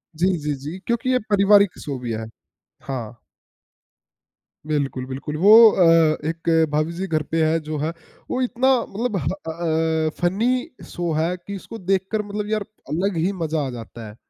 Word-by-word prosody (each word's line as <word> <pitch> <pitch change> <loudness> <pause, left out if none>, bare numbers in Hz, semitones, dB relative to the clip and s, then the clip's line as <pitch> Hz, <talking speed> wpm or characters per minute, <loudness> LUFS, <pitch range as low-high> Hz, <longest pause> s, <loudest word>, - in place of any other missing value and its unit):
जी, 175 +4 +2
जी, 150 -1 -2
जी 150 +7 -7
क्योंकि 235 +2 0
ये 255 0 +3
पारिवारिक 200 -1 +4
शो 140 -3 -4
भी 120 -2 -4
है। 110 0 -4 0.6
हाँ। 120 -3 -6 1.5
बिल्कुल, 140 -4 -1
बिल्कुल 135 +3 -6
वो 200 +6 +5 0.2
अ, 165 -3 +4
एक 165 -1 +1
भाभी 155 +2 0
जी 190 - -2
घर 155 -2 0
पे 165 -1 +2
हैं 160 +1 +2
जो 155 0 -4
है, 155 +3 -1 0.4
वो 255 - 0
इतना 255 +1 +1 0.2
मतलब 220 +1 -2
ह 140 - -3
अ 160 -3 -1
अ, - - +1
फनी 200 +8 +2 0.4
शो 175 -1 -2
है, 165 +4 0
कि 200 +3 -8
उसको 225 +4 -9
देखकर 195 +3 0
मतलब 210 +1 -4
यार 215 -2 0 0.2
अलग 180 +3 -1
ही 175 +5 +1
मज़ा 155 -2 -1
आ - - -4
जाता 115 0 -9
है। 105 - -11
165 Hz, 175 wpm, -22 LUFS, 150-195 Hz, 1.5 s, वो